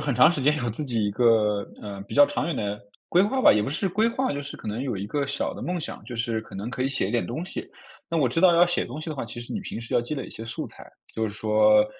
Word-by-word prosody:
很 145 -3 -1
长 155 +8 +7
时 150 - -2
间 150 +3 +3
有 120 -5 -1
自 120 - -4
己 120 -6 -1
一 105 - +1
个， 105 -2 +3 0.2
呃， 100 -2 -6
比 - - -6
较 145 - +8
长 145 - -2
远 170 - -2
的 105 0 -3 0.3
规 180 - +5
划 260 +6 0
吧， - - +8
也 105 - +2
不 105 - -2
是 185 +7 -1
规 215 +5 +3
划， 260 +3 -1
就 145 - -3
是 140 0 -7
可 - - -11
能 110 +4 -2
有 125 -6 -2
一 95 +2 -4
个 140 +6 -1
小 140 0 -1
的 - - -9
梦 180 0 -2
想。 160 - -5
就 120 - -6
是 115 -1 -1
可 110 - -14
能 100 +5 -4
可 125 - -2
以 135 - +1
写 135 -8 0
一 - - -3
点 120 0 0
东 155 +9 -4
西， 185 - -6 0.4
那 165 - -1
我 145 -5 +3
知 125 +7 0
道 180 -1 +7
要 175 +1 +6
写 175 - 0
东 130 - -7
西 155 +1 -5
的 - - -3
话， - - -3
其 115 - -8
实 120 - -8
你 210 - -2
平 195 - -6
时 115 - -7
要 - - +4
积 120 +6 -4
累 135 - -4
一 - - -10
些 115 - -8
素 115 - -4
材。 - - -13 0.2
就 110 0 0
是 - - -4
说， 105 0 +4
125 Hz, 350 characters per minute, -25 LUFS, 110-155 Hz, 0.4 s, 较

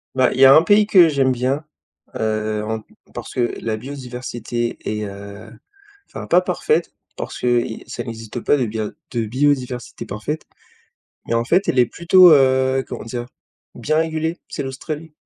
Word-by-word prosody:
Bah, 130 -1 +3
il - - -5
y 135 - +8
a 135 +1 +9
un 155 - +8
pays 205 +4 +4
que 180 -6 +6
j'aime 135 -3 +2
bien, 130 +5 -1 0.5
heu, 110 -1 -1
en 110 0 -4 0.3
parce - - -8
que 120 -2 0
la 110 -1 -2
biodiversité 120 -2 -5
est, 105 0 -3
heu 100 +2 -10 0.6
enfin, - - -8
pas - - +4
parfaite 455 - 0 0.2
parce - - -6
que 120 -1 +2
i 110 - -7
ça - - -6
n'existe 115 0 -7
pas 145 - +2
de 125 - 0
bia 110 -1 -3 0.2
de 115 -2 -1
biodiversité 130 -1 -1
parfaite. 110 +10 -5 0.8
Mais - - -1
en 115 0 +2
fait, 180 +10 +2
elle 130 - +2
est 125 - +6
plutôt, 180 +5 +6
heu, 130 -1 +4
comment - - -6
dire? 120 +1 -5 0.5
Bien 155 +1 -1
régulée. 160 +1 -1
C'est - - -5
l'Australie. 150 +4 -6
125 Hz, 175 wpm, -20 LUFS, 115-145 Hz, 0.8 s, a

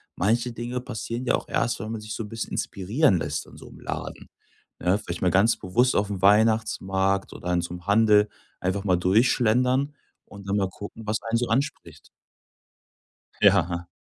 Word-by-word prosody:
manche 115 +6 +1
Dinge 120 +2 -4
passieren 120 +1 -5
ja - - +3
auch - - -5
erst, 115 - 0
wenn 110 0 -5
man 115 -1 -5
sich 110 0 -7
so - - -4
'n 105 - -9
bisschen 115 +1 -5
inspirieren 100 - +1
lässt 75 -2 -3
in - - -16
so - - -12
'nem - - -14
Laden, - - -6 0.5
ne? 90 +3 +2
Vielleicht 90 -4 -6
mal 90 -2 +2
ganz 100 +5 +4
bewusst 120 +7 +1
aufm 100 -2 -1
Weihnachtsmarkt 100 -2 +2
oder 90 - -4
in 85 - +2
so 85 0 -6
'nem 90 +1 -10
Handel 105 0 +4 0.3
einfach 95 +2 -1
mal 90 -3 +2
durchschlendern 125 +8 +2 0.3
und 100 -1 -12
dann 100 +1 0
mal 95 -2 0
gucken, 105 +3 -9
was 110 +1 -1
einen 115 0 0
so 120 +1 -1
anspricht. 135 +6 -3 1.3
Ja. 85 +1 +3
105 Hz, 180 wpm, -25 LUFS, 95-115 Hz, 1.3 s, ganz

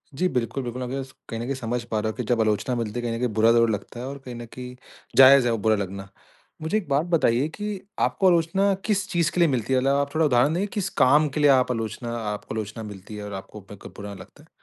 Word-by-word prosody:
जी, 185 +5 +1
बिल्कुल, 125 -1 -2
बिल्कुल। 125 +1 -5
अपने 125 +2 -4
जस 130 - -14 0.2
कहीं 115 - -4
न - - -3
कहीं 140 - -2
समझ 120 -1 -3
पा 110 -2 -2
रहा 110 +1 -1
हूँ - - -5
कि 125 - -2
जब 115 0 +1
आलोचना 110 +3 0
मिलती 115 0 -3
है, - - -3
कहीं 115 -1 -2
न - - -3
कहीं 125 - +1
बुरा 110 +1 +4
ज़रूर 115 -1 +4
लगता 110 +3 -4
है 125 - -5
और 140 +1 -6
कहीं 125 -1 -7
न 120 0 -7
कहीं 125 0 -8 0.4
जायज़ 135 -1 +8
है 120 - +2
वो 115 - 0
बुरा 110 +1 +2
लगना। 95 -1 -5 0.5
मुझे 160 +7 0
एक 185 -8 -4
बात 140 +4 +2
बताइए 150 -6 +2
कि 210 -1 -4 0.2
आपको 190 - +2
आलोचना 180 +3 +3
किस 205 -2 0
चीज़ 170 -3 +1
के 180 - -3
लिए 170 - +5
मिलती 130 0 -1
है? 130 - +4
मतलब 135 +2 +2
आप 140 +1 -1
थोड़ा 160 0 +3
उदाहरण 140 +3 +3
देंगे, 195 +4 0
किस 195 -2 -3
काम 150 +4 +5
के 150 - -4
लिए 145 -1 +5
आप 130 -1 +3
आलोचना 115 +1 -4
आप 105 -2 -4
आलोचना 110 +1 -4
मिलती 105 0 -9
है? 105 - -6
और 100 - -7
आपको 95 +2 -8
ब 100 - -9
कब - - -11
बुरा 100 0 -7
लगता - - -14
है? - - -23
125 Hz, 280 wpm, -24 LUFS, 110-150 Hz, 0.5 s, जायज़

